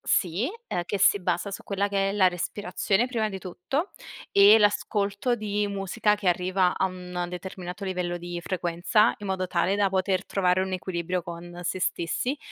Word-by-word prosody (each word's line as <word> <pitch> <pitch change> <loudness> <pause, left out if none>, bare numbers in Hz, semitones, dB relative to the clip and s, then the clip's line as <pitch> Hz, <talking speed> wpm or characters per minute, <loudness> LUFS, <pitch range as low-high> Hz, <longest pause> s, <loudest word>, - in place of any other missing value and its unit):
sì, 185 - +1 0.2
ehm, 175 - -2
che 205 - -1
si 205 - +5
basa 180 +2 -1
su 200 - -7
quella 200 0 -1
che 195 -1 +1
è - - -3
la 190 -3 +5
respirazione, 205 +4 -1
prima 225 -4 -1
di 195 -2 -5
tutto, 200 - -3 0.4
e 200 +2 +8
l'ascolto 205 +2 +1
di 210 -2 -1
musica 200 +2 0
che 205 -3 -1
arriva 180 +1 +2
a - - +2
un 180 -1 -5
determinato 180 +1 -7
livello 180 -2 -2
di 175 0 -6
frequenza, 180 +5 +2
in 205 - -7
modo 190 -1 -1
tale 180 +2 +1
da 205 -1 +3
poter 190 0 0
trovare 185 -1 +1
un 190 - -3
equilibrio 180 -1 -2
con 175 0 -8
sé 185 +1 -2
stessi, 245 - -1
190 Hz, 175 wpm, -26 LUFS, 180-205 Hz, 0.4 s, e